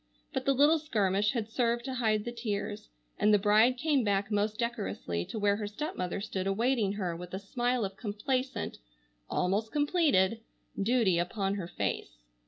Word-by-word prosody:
But - - -2
the 275 - +3
little 295 +4 +5
skirmish 210 -8 +1
had 230 -4 -2
served 235 +1 0
to 265 - -3
hide 220 -4 +1
the 240 - -3
tears, 210 -3 -4 0.3
and 210 - +4
the 210 - +7
bride 215 +5 +4
came 290 -2 +2
back 200 0 0
most 210 +1 0
decorously 220 - -2
to - - -6
where 205 -1 +2
her 210 -1 -3
stepmother 205 - -3
stood 190 -2 -3
awaiting 220 0 +1
her 185 -5 -2
with 180 +2 -7
a - - -3
smile 240 +3 0
of 195 0 -7
complacent—almost 205 - -3
completed—duty 230 - +1
upon 195 +3 -1
her 190 -4 -4
face. - - -3
210 Hz, 160 wpm, -30 LUFS, 195-245 Hz, 0.3 s, the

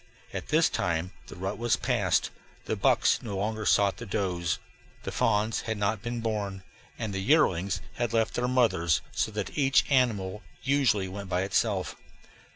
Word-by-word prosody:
At - - -5
this - - +4
time 85 +1 -1 0.2
the - - -10
rut 95 +4 -4
was 120 -1 +2
past, - - +1 0.3
the - - -1
bucks - - +3
no 100 -4 -4
longer 110 +2 -2
sought 100 -1 +3
the 115 - -8
does, 90 -4 -1 0.5
the - - -4
fawns 105 +2 +1
had 110 -1 -3
not 105 0 0
been 120 +1 -4
born, 100 -4 -3 0.3
and 110 -3 -3
the 95 - -2
yearlings 95 - +2 0.2
had 120 -1 -1
left 115 -1 +1
their 125 0 0
mothers; 115 - +2
so - - 0
that 105 -2 -4
each 135 -2 +3
animal 105 -7 +1 0.2
usually 130 -9 +2
went 100 +1 -7
by 90 0 +1
itself. 95 0 0
105 Hz, 165 wpm, -28 LUFS, 95-115 Hz, 0.5 s, this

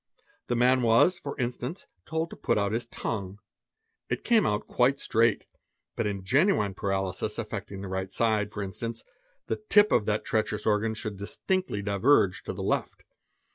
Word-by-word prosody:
The 120 - 0
man 125 +2 +4
was, 120 +10 +4
for 140 - -6
instance, 125 +6 -3 0.2
et 90 - -46
told 160 +1 -2
to - - -7
put - - 0
out 100 -1 +1
his 115 +2 -2
tongue. 100 -4 -4 0.7
It - - -2
came 230 -2 +4
out 105 0 -1
quite 135 +3 +2
straight, 115 +1 +2 0.5
but 115 - 0
in 100 -2 -3
genuine 130 - +3
2 - - -12
paralysis 95 -2 -2
affecting 95 -1 -5
the - - -5
right 95 0 -3
side, 110 -3 +1
for 105 -1 -4
instance, 115 +4 -5 0.4
the - - -3
tip 205 0 +6
of 105 - +2
that 105 0 0
treacherous 110 -3 -1
organ 110 +1 +1
should 110 -2 -4
distinctly 105 - -2
diverge 100 0 +3
to - - -3
the - - -5
left. - - -2
110 Hz, 175 wpm, -28 LUFS, 100-125 Hz, 0.7 s, tip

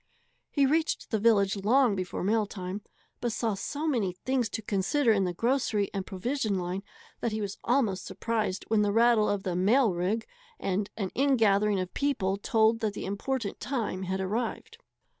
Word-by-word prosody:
He 280 -2 +3
reached 315 +4 0
the 220 - +1
village 200 -3 +3
long 225 +3 +3
before 185 -2 -3
mail 215 +2 +2
time, 190 0 -5 0.4
but 240 - -1
saw 225 -1 -1
so 285 +10 -4
many 225 - 0
things 245 +4 -1
to 220 - -5
consider 220 +7 +2
in 200 -3 +2
the 180 - -1
grocery 230 -3 +1
and 195 -2 -3
provision 215 +1 -1
line 180 +1 -3 0.4
that 235 - -1
he 215 - -2
was 200 -2 -4
almost 230 -7 +1
surprised 215 -5 -2
when 220 -1 +3
the 205 -1 +2
rattle 230 0 +4
of 200 -1 -1
the 180 -2 -2
"mail 210 +4 +3
rig" 190 +6 -1 0.3
and 195 +2 -1
an 195 -4 -2
in 275 0 +3
gathering 205 -2 +3
of 185 -1 -4
people 220 -10 0
told 225 +1 +2
that 215 -3 -1
the - - -5
important 205 +3 -3
time 235 -8 -2
had 190 0 -2
arrived. 225 - -3
215 Hz, 180 wpm, -28 LUFS, 195-240 Hz, 0.4 s, rattle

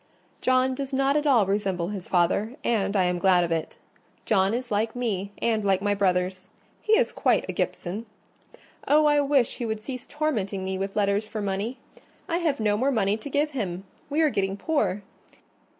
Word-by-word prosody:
John 255 0 +3
does 275 +1 -5
not 275 +1 +2
at 300 0 +1
all 240 -7 +5
resemble 195 -3 -1
his 200 -3 -6
father, 195 +6 +1
and 200 -3 0
I 190 - +4
am 180 0 0
glad 180 -1 +4
of 170 - -2
it: 165 -1 -2 0.5
John 195 -2 +3
is 245 -1 -5
like 220 +3 0
me 200 -5 -2
and 220 -2 +1
like 195 -2 +2
my 205 +1 +1
brothers—he 185 - -2
is 475 +2 +4
quite - - +1
a - - -3
Gibson. 205 +6 -3 0.8
Oh, 300 +1 +5
I 295 -1 +4
wish 275 -3 +2
he 240 - -3
would 220 -1 -2
cease 255 +3 -7
tormenting 210 -11 -2
me 190 0 -3
with 195 +1 -3
letters 205 +1 +1
for 215 - -5
money! 205 +5 -2 0.5
I 335 - 0
have 320 -7 0
no 210 -1 +1
more 260 +5 +1
money 210 -6 +1
to 225 +6 -8
give 295 +2 0
him: 190 -9 -3 0.3
we 300 +3 +1
are 310 -2 +3
getting 195 -2 -1
poor. 205 - 0
210 Hz, 190 wpm, -26 LUFS, 195-265 Hz, 0.8 s, all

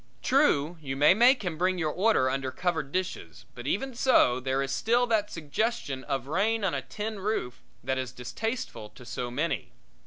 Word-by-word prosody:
True, 175 - +2
you 135 -2 -4
may 145 +5 +6
make 240 +2 +4
him 165 -3 -3
bring 185 +1 +2
your 160 -3 0
order 190 -6 +3
under 135 0 -1
covered 160 -1 -2
dishes, 185 +2 -4
but 125 -1 -8
even 265 - -1
so, 230 - +4
there 135 +1 0
is 135 - -4
still 235 - +2
that 220 -3 +1
suggestion 155 - -2
of 135 -3 -2
rain 205 +9 0
on 190 - +1
a - - -1
tin 215 0 -5
roof 190 - -2 0.2
that 130 +1 -1
is 130 -2 -4
distasteful 130 - -5
to 120 +4 -15
so 120 +1 -4
many. 145 +7 -2
165 Hz, 185 wpm, -28 LUFS, 135-215 Hz, 0.2 s, may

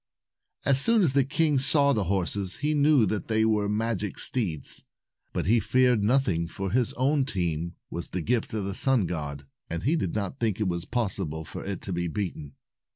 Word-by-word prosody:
As 135 -1 +5
soon 230 +4 +4
as 150 -7 +3
the 140 -1 +4
king 150 +1 +1
saw 140 +1 +4
the 105 -5 0
horses, 95 +1 0
he 150 +2 0
knew 145 -4 +4
that 105 +1 -2
they 110 0 +2
were 105 -2 +1
magic 105 -2 -2
steeds. 95 - -1 0.5
But - - -2
he 115 +6 +4
feared 125 -2 +2
nothing, 100 -8 +1
for 95 +2 -5
his 125 +1 +1
own 140 +3 +1
team 85 - -2 0.2
was 85 - -5
the 90 - -3
gift 115 +5 -1
of 105 -3 -2
the 100 - -3
sun 130 -2 +4
god, 75 -4 -5 0.2
and 85 0 -4
he 150 +7 +2
did 95 - -2
not 105 +5 -3
think 110 -4 0
it 105 - 0
was 85 -1 -2
possible 95 -9 -3
for - - -8
it 95 -2 -5
to 95 - -4
be 85 0 -1
beaten. 80 -6 -5
105 Hz, 200 wpm, -27 LUFS, 90-130 Hz, 0.5 s, As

